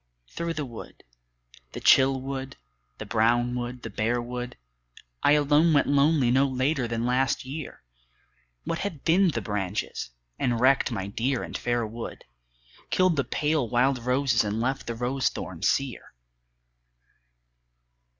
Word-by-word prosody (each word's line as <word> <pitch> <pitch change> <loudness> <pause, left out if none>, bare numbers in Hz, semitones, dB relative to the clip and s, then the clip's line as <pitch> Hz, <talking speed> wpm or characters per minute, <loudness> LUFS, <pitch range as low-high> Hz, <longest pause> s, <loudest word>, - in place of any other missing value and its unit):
Through 170 0 -3
the 150 - -3
wood, 120 -3 -11 0.7
the - - -5
chill 135 0 +5
wood, 135 0 -6 0.4
the - - -7
brown 120 +2 +2
wood, 125 0 -5
the - - -5
bare 115 +3 0
wood, 125 +1 -5 0.6
I 145 - +5
alone 150 +2 +4
went 145 - +4
lonely 140 -2 +3
no 135 +2 +4
later 130 0 0
than 115 0 -2
last 130 +1 +1
year, 140 - -7 0.8
What 165 - -3
had 170 -9 -5
thinned 175 0 +4
the 115 - -2
branches, 100 - -3 0.3
and 120 -2 0
wrecked 130 +1 +3
my 95 -5 -3
dear 120 +5 -1
and - - -8
fair 120 -1 0
wood, 115 +2 -8 0.6
Killed 185 -2 +3
the 140 - +1
pale 150 -5 0
wild 125 +2 +2
roses 130 +2 +2
and 105 +1 -2
left 130 +3 -2
the 115 - -3
rose 125 +2 0
thorns - - -3
sere? 135 - -2
130 Hz, 145 wpm, -26 LUFS, 120-140 Hz, 0.8 s, chill